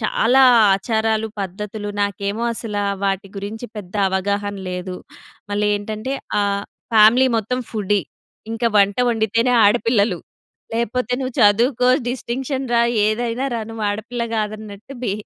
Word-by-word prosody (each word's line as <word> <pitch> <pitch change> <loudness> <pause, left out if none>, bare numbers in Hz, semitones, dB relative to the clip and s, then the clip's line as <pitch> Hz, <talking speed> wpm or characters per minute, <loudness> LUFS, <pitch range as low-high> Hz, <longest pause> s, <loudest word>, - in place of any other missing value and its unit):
చాలా 240 +4 +2 0.3
ఆచారాలు 220 +1 0
పద్ధతులు 205 +2 -5
నాకేమో 200 +2 -2
అసల 220 -2 -5 0.3
వాటి 195 0 -1
గురించి 215 +4 -6
పెద్ద 195 -2 -9
అవగాహన 200 +2 -1 0.2
లేదు. 180 0 -5 0.6
మళ్ళేంటంటే 210 +4 -1 0.3
ఆహ్, 200 0 0 0.3
ఫ్యామిలీ 225 +4 +6
మొత్తం 240 +4 -1
ఫుడీ. 205 -2 0 0.5
ఇంకా 230 +1 0
వంట 200 +2 +3
వండితేనే 230 +2 +1
ఆడపిల్లలు. 210 -3 +2 0.6
లేకపోతే 235 +1 -1
నువ్వు 255 -2 -4
చదువుకో, 235 +4 +4 0.2
డిస్టింక్షన్ 260 +2 -3
రా 235 - +4 0.2
ఏదైనా 235 +4 -1
రా 230 - -2
నువ్వు 225 -1 -4
ఆడపిల్ల 235 +3 -4
గాదన్నట్టు 215 +3 -5
బి 205 - 0
215 Hz, 120 wpm, -20 LUFS, 205-235 Hz, 0.6 s, ఫ్యామిలీ